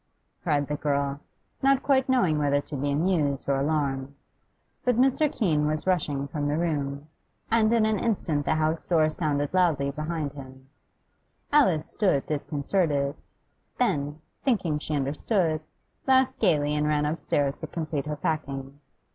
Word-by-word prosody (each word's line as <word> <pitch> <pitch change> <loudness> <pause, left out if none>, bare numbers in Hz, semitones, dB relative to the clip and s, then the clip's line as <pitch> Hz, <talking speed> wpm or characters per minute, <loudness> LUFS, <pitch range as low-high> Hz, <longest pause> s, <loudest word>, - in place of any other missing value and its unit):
cried 145 -4 +1
the 150 - -3
girl, 140 -1 -1 0.4
not 275 0 +3
quite 265 -2 +2
knowing 185 -13 +3
whether 145 -1 +2
to 145 +1 -7
be 140 +1 -1
amused 145 -2 0
or 140 -1 +2
alarmed. 140 -2 -1 0.7
But 250 -2 +2
Mr. 270 +4 +3
Keene 155 -9 +1
was 155 0 -2
rushing 150 -7 0
from 145 0 -3
the 145 +1 0
room, 145 -3 -2 0.4
and 225 -1 +4
in 230 -2 +4
an 215 -2 +1
instant 165 -10 -1
the - - +2
house 155 +1 0
door 155 -3 +2
sounded 145 -2 -1
loudly 160 -7 +2
behind 155 0 -3
him. 130 -1 -11 0.9
Alice 185 - +4
stood 185 -10 +1
disconcerted; 145 -1 -1 0.6
then, 145 +2 0 0.2
thinking 180 - +1
she 150 0 -3
understood, 155 - 0 0.5
laughed 260 0 +3
gaily 145 -1 +2
and 150 0 +1
ran 150 -1 +1
upstairs 145 -2 -1
to 160 - -5
complete 155 -3 -3
her 150 - -2
packing. 140 -2 -3
150 Hz, 145 wpm, -26 LUFS, 145-180 Hz, 0.9 s, and